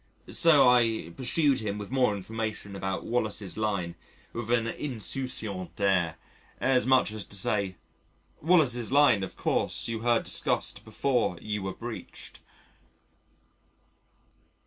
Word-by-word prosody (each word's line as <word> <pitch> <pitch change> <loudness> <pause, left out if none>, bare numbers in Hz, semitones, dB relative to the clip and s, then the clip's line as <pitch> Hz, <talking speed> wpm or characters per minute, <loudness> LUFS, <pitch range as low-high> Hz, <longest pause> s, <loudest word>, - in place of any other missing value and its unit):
So 155 -6 +6
I 115 -8 +2
pursued 140 +2 +1
him 105 -2 -3
with 105 +2 -7
more 125 -6 +2
information 110 0 -5
about 95 -2 -3
"Wallace's 110 -4 -1
Line," 100 -5 -2 0.4
with 115 -1 -5
an 120 -1 +2
insouciant 115 -6 -3
air, 90 -5 +2 0.4
as 130 -1 +2
much 130 -5 +4
as 110 -1 -4
to - - -4
say, 100 -1 0 0.7
"Wallace's 140 -9 +3
Line 140 -7 +5
of 95 - -5
course - - 0
you 115 -1 -3
heard 120 0 +2
discussed - - 0
before 125 -9 0
you 105 +1 -3
were 95 0 -4
breached." 120 -1 -9
110 Hz, 125 wpm, -28 LUFS, 100-125 Hz, 0.7 s, So